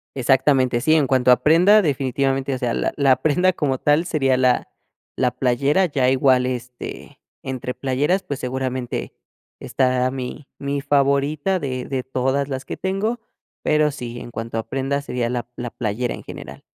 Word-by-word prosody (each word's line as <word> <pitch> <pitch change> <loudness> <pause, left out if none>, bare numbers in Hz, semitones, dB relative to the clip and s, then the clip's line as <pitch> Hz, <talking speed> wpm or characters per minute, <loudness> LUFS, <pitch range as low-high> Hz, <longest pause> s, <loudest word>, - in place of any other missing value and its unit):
Exactamente, 130 -1 +2
sí, 155 +4 +3
en 145 -4 +3
cuanto 130 -1 +3
a 125 - +6
prenda, 180 +7 +6
definitivamente, 135 -2 0
o - - -2
sea, 120 -2 -1
la - - -1
la 135 -3 +4
prenda 180 +4 +3
como 135 -6 -1
tal 150 +5 +2
sería 135 -6 +1
la 125 -1 +2 0.5
la 125 -1 +1
playera, 135 +8 +2
ya 135 -6 +1
igual, 130 -1 +3
este, 125 -1 -6 0.2
entre 125 -1 -4
playeras, 140 +9 0
pues, 140 -6 -5
seguramente 130 -1 -3 0.5
estará 130 -1 +1
mi 135 +2 -6
mi 140 0 -2
favorita 145 +6 +1
de 130 -4 -4
de 130 -2 -3
todas 135 +2 -1
las 135 0 -4
que - - -5
tengo, 210 +5 -2 0.4
pero 150 0 +3
sí, 120 -4 -7
en 120 - -9
cuanto 115 0 -5
a 110 - -1
prenda, 135 +2 -1
sería 125 -4 -2
la 120 -1 -3
la 120 -1 -5
playera 115 +2 -2
en - - -9
general. - - -10
135 Hz, 170 wpm, -21 LUFS, 125-145 Hz, 0.5 s, a